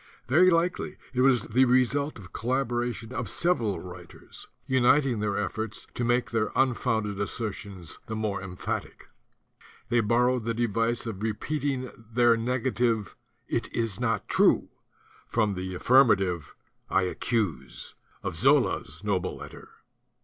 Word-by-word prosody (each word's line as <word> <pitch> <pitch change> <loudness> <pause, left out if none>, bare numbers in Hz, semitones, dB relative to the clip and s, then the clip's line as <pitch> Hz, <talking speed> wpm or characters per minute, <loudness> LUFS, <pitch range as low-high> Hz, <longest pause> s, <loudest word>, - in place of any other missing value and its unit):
Very 165 +9 +6
likely 175 +2 0 0.2
it 125 - +1
was 130 -3 +4
the 130 +4 +3
result 130 +3 +2
of 90 -4 -13
collaboration 120 -1 -2
of - - -3
several 120 - 0
writers, 90 +1 -11 0.2
uniting 130 -1 +3
their 105 -1 -1
efforts 110 +1 -3
to 120 - -3
make 120 +1 +1
their 115 -2 0
unfounded 110 -5 +1
asser 110 +2 -2
tions 95 -5 -9
the 110 - -4
more 105 -3 -2
emphatic. 90 -1 -5 0.8
They 120 - +3
borrowed 120 +2 +2
the 115 +1 -2
device 115 +1 0
of 105 -4 -5
repeating 130 +4 -2
their 115 +1 +2
negative 120 -2 0 0.3
"It - - -2
is 115 -3 -1
not 115 -4 -1
true" - - +3 0.6
from 110 -3 +1
the 95 0 -4
affirmative 95 - +3 0.3
"I - - +3
accuse" 100 - -2 0.3
of - - -3
Zola's 80 +8 +2
noble 100 -4 -1
letter. - - -11
115 Hz, 130 wpm, -27 LUFS, 105-125 Hz, 0.8 s, Very